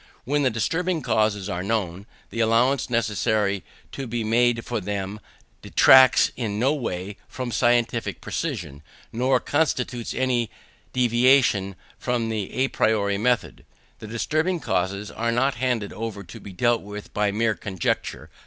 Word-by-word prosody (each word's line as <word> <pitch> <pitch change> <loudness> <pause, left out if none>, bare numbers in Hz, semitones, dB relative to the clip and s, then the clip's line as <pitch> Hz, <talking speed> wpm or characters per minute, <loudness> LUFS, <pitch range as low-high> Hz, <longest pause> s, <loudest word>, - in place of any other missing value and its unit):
When 145 +4 0
the 135 - +3
disturbing 165 - -1
causes 105 -3 +1
are 90 -3 -3
known, 100 -2 -2 0.2
the 115 - -5
allowance 120 +5 +2
necessary 110 -3 0 0.3
to 135 -2 -6
be 120 0 -2
made 115 +1 +2
for 120 -3 -2
them 100 +1 -4 0.4
detracts 130 -1 +6
in 105 -4 -3
no 130 +6 +2
way 100 -8 -4
from 125 -2 -5
scientific 120 -1 +1
precision, 70 0 -4 0.3
nor 125 +2 +2
constitutes 130 -6 -1
any 125 -3 0 0.4
deviation 120 -5 +3 0.2
from 120 -2 -1
the 105 -3 -2
à 130 +1 -1
priori 100 -2 +1
method. 125 +2 0 0.4
The 110 - -9
disturbing 155 - -1
causes 100 - -2
are 115 +1 -1
not 130 +4 +2
handed 120 -5 -1
over 110 -2 -5
to 85 - -11
be 100 - -10
dealt 120 +5 +1
with 105 +1 -9
by 105 -1 +1
mere 110 +2 +1
conjecture. 95 -4 -3
115 Hz, 145 wpm, -24 LUFS, 105-125 Hz, 0.4 s, detracts